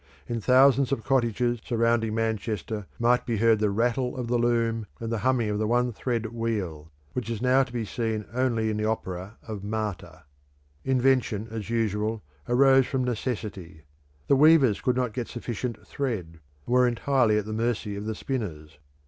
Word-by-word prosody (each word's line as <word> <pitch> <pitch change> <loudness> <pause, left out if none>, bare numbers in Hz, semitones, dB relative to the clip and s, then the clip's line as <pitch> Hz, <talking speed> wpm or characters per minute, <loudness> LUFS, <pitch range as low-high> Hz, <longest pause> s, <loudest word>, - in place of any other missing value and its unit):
In 115 +5 -3
thousands 130 +3 +5
of 120 -5 -1
cottages 120 -1 +1
surrounding 115 -1 +1
Manchester 110 -2 -2
might 120 +1 +3
be 115 -4 -2
heard 115 0 +4
the 105 -1 +2
rattle 120 +5 0
of 125 - -3
the 120 +1 0
loom 115 -2 +1
and 115 0 -4
the 115 - -1
humming 120 -1 +1
of 105 - -1
the 110 - 0
one 120 +1 +1
thread 115 0 -2
wheel, 95 -10 -3 0.2
which 125 -2 -3
is 115 -3 -3
now 130 +2 +4
to 130 -2 -3
be 120 -2 -3
seen 110 -1 -2
only 120 -3 +1
in 105 - -2
the 105 - -1
opera 100 -1 -3
of 105 -3 -6
Marta. 105 -2 -4 0.6
Invention, 130 -5 +1
as 110 -2 -5
usual, 110 -2 -1 0.3
arose 135 +1 +5
from 130 -1 -1
necessity; 105 - -4 0.4
the 140 - +4
weavers 140 -6 +5
could 125 - +1
not 125 -3 -1
get 120 -2 -3
sufficient 120 0 -5
thread, 100 - -4 0.3
and 120 - -2
were 125 0 +5
entirely 120 -2 +2
at 105 - -1
the 110 - -5
mercy 110 -2 -1
of 100 +1 -5
the 110 0 -3
spinners. 80 - -5
115 Hz, 175 wpm, -26 LUFS, 105-125 Hz, 0.6 s, thousands